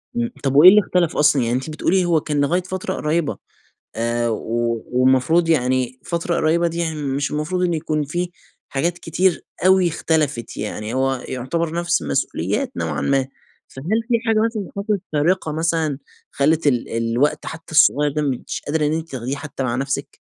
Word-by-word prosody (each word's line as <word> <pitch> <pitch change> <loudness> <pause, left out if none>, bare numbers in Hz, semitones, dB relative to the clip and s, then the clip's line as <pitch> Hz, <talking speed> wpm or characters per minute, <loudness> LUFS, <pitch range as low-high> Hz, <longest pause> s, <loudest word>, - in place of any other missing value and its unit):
إمم، 235 0 -1
طب 135 -1 0
وإيه 155 +6 +10
اللي 210 +2 +6
إختلف 180 -3 0
أصلًا، 150 -2 +4
يعني 120 0 0
أنتِ 130 +4 -3
بتقولي، 175 +4 +1
هو 165 -3 +2
كان 145 -1 -1
لغاية 170 +6 +2
فترة 185 0 -4
قريِّبة، 155 +1 -1 0.6
آآ 120 +1 0
و 115 +1 -2
والمفروض 130 +7 +3
يعني، 130 -3 +1
فترة 170 0 -1
قريِّبة 170 +2 +2
دي، 165 0 -4
يعني 165 -2 -1
مش 140 +1 -1
المفروض 150 +5 -2
إن 175 -1 +1
يكون 155 -1 -1
في 175 +5 -3 0.4
حاجات 165 +6 -1
كتير 175 +2 0 0.2
أوي 185 -1 +5
إختلفِت، 155 -6 -1
يعني 105 +1 -4
هو 130 -1 0
يُعتبر 155 +6 -2
نفس 170 - +1
المسؤوليات 70 -2 -1
نوعًا 80 -4 -2
ما. 135 -1 +1 0.4
فهل 180 +13 -2
في 245 - 0
حاجة 220 -1 +3
مثلًا 220 -4 -3
حصلِت 200 -1 -1
فارقة 160 +2 +1
مثلًا 160 -2 0 0.3
خلّت 155 +2 +1
ال 125 -4 +1
الوقت 115 +5 0
حتى 160 0 -8
الصغيَّر 150 -1 +4
ده، 150 +2 -1
مش 135 -4 -3
قادرة 150 +1 +1
إن 150 - +1
أنتِ 165 +1 -4
تاخديه 130 +1 -3
حتى 140 -2 -6
مع 120 -2 -1
نفسِك؟ 135 +2 -3
150 Hz, 175 wpm, -21 LUFS, 130-170 Hz, 0.6 s, وإيه